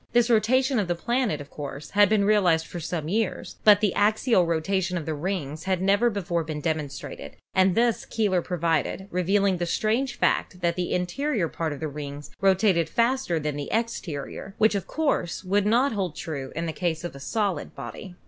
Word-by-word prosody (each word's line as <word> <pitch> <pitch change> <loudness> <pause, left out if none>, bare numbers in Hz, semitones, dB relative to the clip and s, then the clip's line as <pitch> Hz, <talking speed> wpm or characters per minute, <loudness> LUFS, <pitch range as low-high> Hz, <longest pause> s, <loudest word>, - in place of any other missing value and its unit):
This 240 0 +4
rotation 255 +3 +3
of 200 - 0
the 175 - 0
planet, 235 - 0
of 145 - -12
course, 145 0 -7
had 205 -1 +5
been 210 -2 +3
realized 180 -6 +3
for 175 - -7
some 160 -1 -3
years, 215 +3 -2
but 210 -1 +7
the 210 -4 +2
axial 210 -2 +3
rotation 180 +3 0
of 160 - -4
the 160 - -2
rings 155 -1 -4
had 190 -2 +1
never 200 +5 +3
before 175 -5 -2
been 155 -1 -5
demonstrated, 155 -3 -4 0.2
and 185 -1 +3
this 235 -3 +2
Keeler 200 -5 +1
proved, 170 +1 -1
revealing 190 +2 +2
the 175 0 -2
strange 230 +9 0
fact 180 - 0
that 170 -1 +1
the 180 -1 -2
in 180 0 +1
terior 230 - -1
part 165 -2 -2
of 145 - -6
the 160 - -2
rings 145 0 -7
rotated 190 -3 +3
faster 235 -7 +1
than 150 -1 -2
the 145 - -5
exterior, 195 -5 -3
which 220 0 +4
of 200 -2 -2
course 290 - -1
would 200 +2 +1
not 245 +6 +3
hold 190 -7 -2
true 140 -3 -5
in 165 +2 -2
the 160 - -3
case 165 -2 -2
of 175 - -5
a - - -9
solid 200 +6 -2
body. 185 -4 -8
185 Hz, 195 wpm, -26 LUFS, 160-215 Hz, 0.2 s, but